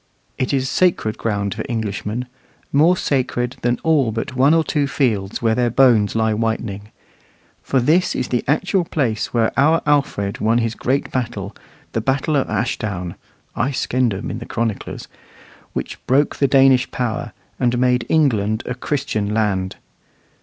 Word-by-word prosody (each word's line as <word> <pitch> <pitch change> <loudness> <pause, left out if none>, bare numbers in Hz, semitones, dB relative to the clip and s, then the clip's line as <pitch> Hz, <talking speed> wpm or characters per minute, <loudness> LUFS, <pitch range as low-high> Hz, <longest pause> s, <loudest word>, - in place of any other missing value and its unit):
It 130 - 0
is 135 -2 0
sacred 170 -13 +1
ground 100 -3 -1
for - - -4
Englishmen 110 +1 -3 0.5
more 165 +6 +5
sacred 125 -4 -1
than 120 0 +1
all 150 -8 +3
but 115 +4 -4
one 135 +3 +4
or 165 - +3
two 145 -2 0
fields 110 -8 -1
where 110 -1 +3
their 120 +1 +1
bones 115 -5 +4
lie 110 -1 +2
whitening. 105 -2 -2 0.7
For 135 - +1
this 160 +9 +2
is 125 - -2
the 125 - 0
actual 180 +6 +1
place 120 -9 -1
where 115 -2 +2
our 155 +4 +3
Alfred 140 -9 0
won 110 +2 +2
his 115 -1 0
great 130 +4 -1
battle, 110 -6 -3 0.4
the 115 - -1
battle 135 +5 0
of 135 - +1
Ashdown 100 -5 -2 0.4
("Aescendum" 120 -3 -1
in 115 - -5
the 115 - -9
chroniclers), 115 -3 -3 0.7
which - - -5
broke 140 +4 +2
the 140 - +3
Danish 135 -2 +4
power, 120 -2 -3 0.3
and 125 -1 +1
made 125 -1 +2
England 110 -8 +2
a 125 - -3
Christian 125 -6 -2
land. 95 -4 0
120 Hz, 155 wpm, -20 LUFS, 110-135 Hz, 0.7 s, more